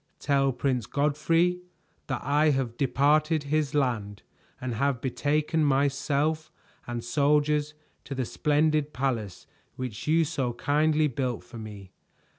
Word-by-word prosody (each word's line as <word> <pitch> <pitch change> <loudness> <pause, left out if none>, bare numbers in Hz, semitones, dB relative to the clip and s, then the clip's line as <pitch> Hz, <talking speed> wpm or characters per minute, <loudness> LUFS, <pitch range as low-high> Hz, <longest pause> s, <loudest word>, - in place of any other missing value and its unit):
Tell 140 -1 +2
Prince 125 -4 -1
Godfrey 165 +5 +1 0.5
that - - -3
I 150 +3 +3
have 130 -5 0
departed 150 +4 +2
his 150 0 -1
land 110 -8 -1 0.4
and 125 -1 -3
have 140 +2 0
betaken 150 +5 0
myself 145 +2 +1 0.4
and 120 -1 -4
soldiers 150 +3 +1 0.3
to 140 - -5
the 130 -1 -1
splendid 150 +2 +1
palace 120 -8 -2 0.3
which 125 -2 -6
you 165 +1 +4
so 135 -6 -2
kindly 150 +4 +2
built 130 -3 -3
for 120 - -11
me. 105 -4 -9
140 Hz, 125 wpm, -27 LUFS, 125-150 Hz, 0.5 s, you